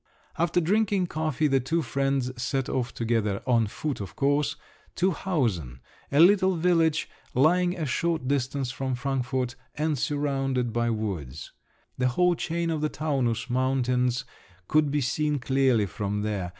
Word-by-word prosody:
After 170 +1 +1
drinking 195 +2 +2
coffee, 155 -3 -1
the 135 -2 +3
two 160 +6 -1
friends 135 -2 0
set 135 +1 -1
off 125 -2 -1
together—on 115 0 0
foot, 140 +4 -4
of 95 - -7
course—to 145 +6 -1
Hausen, 110 - -1 0.3
a 140 - +2
little 190 +2 +6
village 165 -2 +2 0.3
lying 175 +7 +3
a 160 - -2
short 160 +1 -1
distance 135 -1 -1
from 130 0 -2
Frankfort, 125 -1 -2 0.2
and 150 -2 0
surrounded 135 -4 -1
by 120 0 +1
woods. 95 - -4 0.5
The 125 - +3
whole 180 +8 +3
chain 170 0 -2
of 155 -2 -2
the 155 - +1
Taunus 135 -8 -1
mountains 125 0 +1 0.4
could 155 -1 +3
be 145 +1 0
seen 150 +3 0
clearly 130 -3 +2
from 105 +1 -3
there. 100 -4 -2
135 Hz, 140 wpm, -26 LUFS, 120-155 Hz, 0.5 s, little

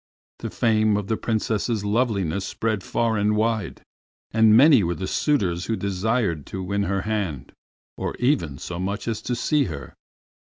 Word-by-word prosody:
The - - -4
fame 110 -2 +2
of 105 - -3
the 110 - +2
Princess's 110 -1 -1
loveliness 100 -5 0
spread 110 0 -2
far 115 -2 0
and 105 +1 +2
wide, 110 -1 -1 0.5
and 110 -1 +5
many 140 -2 +7
were 85 -1 -1
the 95 - -4
suitors 95 - 0
who 115 - -1
desired 100 - -1
to 95 - -5
win 100 +2 -1
her 95 +1 -1
hand, 95 -12 -3 0.5
or - - -3
even 120 - 0
so 85 +4 -6
much 100 +4 -3
as 110 -2 -2
to 125 - -2
see 145 +4 +1
her. 70 - -7
105 Hz, 165 wpm, -24 LUFS, 95-115 Hz, 0.5 s, many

